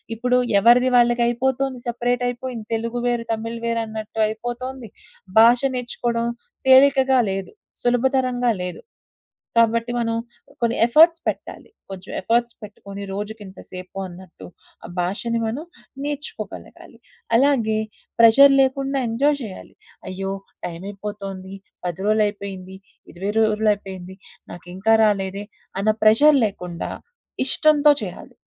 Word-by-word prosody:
ఇప్పుడు 250 +2 +1 0.2
ఎవరిది 240 +4 +5
వాళ్ళకయిపోతుంది. 240 +2 +1
సెపరేటయిపోయింది. 245 0 -2
తెలుగు 230 +2 -3
వేరు, 240 -1 0
తమిళ్ 230 +1 -5
వేరన్నట్టయిపోతుంది. 230 +2 -3 0.5
భాష 235 +2 +6
నేర్చుకోవడం 235 -1 -2 0.4
తేలికగా 265 0 +6
లేదు. 195 0 -4 0.3
సులభతరంగా 245 0 +1
లేదు. 180 -1 -6 0.8
కాబట్టి, 230 +1 +3
మనం 230 -1 -1 0.5
కొన్ని 235 0 +1
ఎఫర్ట్స్ 325 +7 +5
పెట్టాలి. - - -5 0.2
కొంచెం 190 -1 -9
ఎఫర్ట్స్ 235 +4 0
పెట్టుకొని, 200 -1 -10
రోజుకింత 205 -1 -7
సేపు 185 +1 -9
అన్నట్టు, 180 0 -13 0.4
ఆ - - -7
భాషని 210 +6 -1
మనం 265 +9 -4 0.4
నేర్చుకోగలగాలి. 290 0 -7 0.4
అలాగే 235 -5 +2 0.4
ప్రెషర్ 275 +5 +8
లేకుండా 270 +1 0
ఎంజాయ్ 280 +6 +1
చేయాలి. 200 -5 -9 0.4
అయ్యో! 195 +1 -4 0.3
టైమయిపోతుంది, 195 +1 -7 0.3
10 175 0 -3
రోజులయిపోయింది, 200 -3 -1 0.4
20 195 +4 -3
రోజులయిపోయింది. 205 -4 -1 0.3
నాకింకా 185 +6 0
రాలేదే 200 -1 -1 0.3
అన్న 215 +2 +3
ప్రెజర్ 280 +8 +6
లేకుండా 180 -4 -6 0.6
ఇష్టంతో 300 +1 +4
చేయాలి. - - -9
230 Hz, 100 wpm, -22 LUFS, 200-245 Hz, 0.8 s, ప్రెషర్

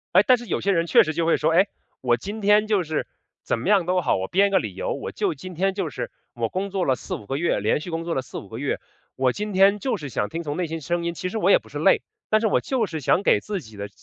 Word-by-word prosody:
哎， 190 - +8
但 255 -1 +6
是 240 - -9
有 - - -1
些 200 - +2
人 170 -2 +1
确 - - +6
实 155 - -3
就 165 +1 0
会 165 - +4
说， 155 +2 +1
哎， 185 +5 +4 0.3
我 120 -2 +2
今 205 - -6
天 210 +1 +4
就 205 -4 +2
是， 155 -1 -2 0.4
怎 - - -1
么 - - -4
样 195 -4 +4
都 180 0 +2
好， 170 - +1
我 95 0 -3
编 200 +2 +4
个 195 - +3
理 - - -5
由， - - -3
我 - - -5
就 390 -5 -1
今 185 -7 -9
天 190 +3 0
就 195 - -2
是 - - -5 0.2
我 - - -1
工 195 +2 -3
作 190 -2 -1
了 130 - +2
4、5 105 - -6
个 135 - -3
月， 165 -7 +1
连 110 +8 +1
续 175 - -7
工 165 0 -3
作 170 - -2
了 130 - 0
4、5 - - -9
个 - - -8
月， - - -2 0.4
我 130 -1 +2
今 210 0 -4
天 195 +1 +5
就 235 0 -1
是 145 -4 -7
想 105 -4 -2
听 165 - -4
从 150 -3 -4
内 180 0 -1
心 165 +1 -4
声 170 +3 -2
音。 170 0 -2
其 180 - -4
实 205 +5 -3
我 - - +3
也 - - +6
不 - - -20
是 - - -6
累， - - +4 0.3
但 215 - +4
是 220 - +1
我 - - +2
就 255 -5 0
是 160 -5 -5
想 185 +8 +2
给 - - +4
自 205 -3 -3
己 110 -7 -13
的 100 0 -6
180 Hz, 320 characters per minute, -24 LUFS, 155-205 Hz, 0.4 s, 哎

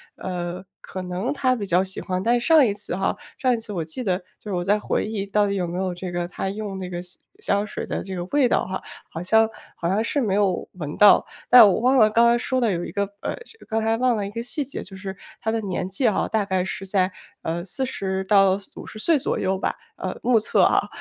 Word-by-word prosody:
呃， 180 0 -4 0.2
可 185 - -6
能 180 +8 -2
他 260 -3 +2
比 210 -4 -4
较 180 +1 +3
喜 190 0 -5
欢， 185 0 -2
但 240 +2 +3
上 305 +3 +5
一 210 - +1
次 205 +1 -4
哈， 195 +1 0 0.2
上 255 -1 +2
一 - - 0
次 220 -2 -7
我 170 -4 -2
记 165 +11 -6
得 185 -3 +2 0.2
就 210 - -9
是 - - -2
我 175 -1 -1
在 205 +3 +2
回 - - -1
忆 210 -2 -3
到 210 +1 +2
底 200 - -1
有 180 -3 -1
没 170 +1 -4
有 185 -1 -1
这 180 0 -6
个， 175 0 -1
他 190 - -3
用 200 -1 -5
那 185 -1 -5
个 175 -1 -4
香 180 0 -10 0.2
香 205 - 0
水 - - -5
的 - - -3
这 190 -1 -6
个 175 - -3
味 275 +6 +3
道 - - +1
哈， 190 - -4 0.3
好 165 - -6
像 220 +5 +4 0.3
好 170 - -3
像 200 +4 +2
是 285 - -1
没 210 -6 0
有 195 -3 +1
闻 155 -5 -6
到。 205 -1 +7 0.2
但 245 -3 +10
我 195 - +2
忘 255 +3 +4
了 215 -3 +6
刚 230 +2 +4
刚 235 0 +4
说 260 +1 0
的 230 -3 +2
有 175 -2 -2
一 - - -7
个 200 - 0 0.2
呃， - - -2 0.3
刚 220 0 -1
才 225 0 +2
忘 250 0 +2
了 205 -2 -2
一 200 - -6
个 230 - -4
细 250 +5 -2
节， 270 - -6
就 190 - -10
是 190 0 -6 0.3
他 220 - 0
的 225 0 -1
年 185 -3 -3
纪 195 +7 0
啊， 215 - +1
大 220 -2 +1
概 190 -2 0
是 195 0 -5
在， 190 -1 +1 0.3
呃， 170 +1 -2
40 190 -3 -2
到 195 -1 +5 0.2
50 - - -9
岁 315 +9 +3
左 - - -1
右 190 0 0
吧， - - -1 0.2
呃， - - -4
目 245 -2 +4
测 210 - +2
啊。 - - +3
200 Hz, 270 characters per minute, -23 LUFS, 185-225 Hz, 0.3 s, 但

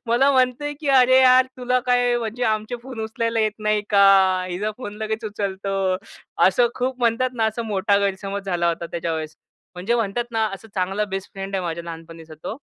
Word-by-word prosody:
मला 255 +5 +3
म्हणतंय, 255 +3 +1
की 290 - -3
"अरे 260 -1 +6
यार, 255 0 +6
तुला 250 0 +1
काय 245 -1 +3
म्हणजे 230 +2 -4
आमचे 215 +2 -1
फोन 255 -3 -8
उचलायला 230 +1 -1
येत 215 -1 +1
नाही 215 -1 0
का, 200 -1 +6 0.4
हिचा 200 +4 -2
फोन 205 -5 -7
लगेच 220 +1 -3
उचलतो." 195 -2 -2 0.5
असं 235 +6 +3
खूप 255 0 -2
म्हणतात 240 +2 +1
ना, 225 -2 0
असं 220 +2 -2
मोठा 200 0 +1
गैरसमज 195 0 -2
झाला 175 -2 0
होता 170 0 -2
त्याच्यावेळेस. 160 -2 -4 0.4
म्हणजे 190 +7 -1
म्हणतात 230 +1 -1
ना, 220 -1 +1
असा 225 +3 -13
चांगला 195 +3 0
बेस्ट 195 - -8
फ्रेंड 195 0 -6
आहे 185 - -3
माझ्या 170 0 -4
लहानपणीचा 165 -1 -10
तो. 220 - -4
215 Hz, 185 wpm, -22 LUFS, 190-245 Hz, 0.5 s, अरे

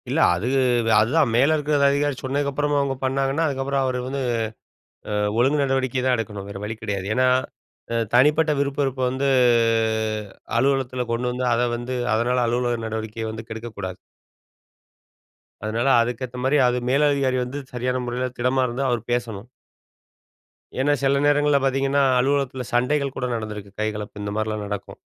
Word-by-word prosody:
இல்ல. - - 0 0.2
அது 95 +7 -3 0.5
அதுதான் 130 +4 +2
மேல 140 +6 +4
இருக்கிற 150 0 0
அதிகாரி 145 0 +1
சொன்னதுக்கப்புறமும் 145 +2 0
அவுங்க 140 -1 0
பண்ணாங்கன்னா, 135 +3 0
அதுக்கப்புறம் 135 -1 -1
அவரு 130 -1 -1
வந்து 135 +1 -3 0.9
அ - - -1 0.2
ஒழுங்கு 135 +5 +3
நடவடிக்கை 130 -2 0
தான் 130 -1 +3
எடுக்கணும், 105 -3 -5
வேற 100 - -7
வழி 110 +2 -4
கிடையாது. 100 -3 -3
ஏன்னா, 130 +2 +3 0.7
அ - - 0 0.2
தனிப்பட்ட 150 +5 +4
விருப்பு 140 0 -1
வெறுப்ப 135 -1 -2
வந்து 135 +2 0 1.3
அலுவலகத்தில 130 -1 +1
கொண்டு 125 +1 -1
வந்து 125 +1 -2
அத 120 - +1 0.2
வந்து 120 +2 -4 0.2
அதனால 125 +2 +1
அலுவலக 120 -1 -1
நடவடிக்கைய 110 0 -4
வந்து 110 +1 -8
கெடுக்கக்கூடாது. 110 -5 -6 1.7
அதனால 115 +4 -1
அதுக்கு 120 +2 -2
ஏத்தமாரி 125 +4 0
அது 125 0 +1
மேலதிகாரி 140 -1 +2
வந்து 125 +3 -6 0.2
சரியான 125 +1 -1
முறையில 125 +1 -2
திடமா 125 +2 +1
இருந்தா, 125 +3 -2
அவரு 120 -2 0
பேசணும். 115 -3 -3 1.3
ஏன்னா, 145 +2 +3
சில 140 0 +3
நேரங்கள்ல 145 0 +3
பார்த்தீங்கன்னா, 135 +1 +2 0.2
அலுவலகத்தில 135 -1 0
சண்டைகள் 135 +3 +1
கூட 125 - -2
நடந்திருக்கு. 105 -2 -6
கைகலப்பு 105 -1 -4
இந்தமாரிலாம் 110 +1 -2
நடக்கும். 100 -1 -6
125 Hz, 140 wpm, -23 LUFS, 115-140 Hz, 1.7 s, மேல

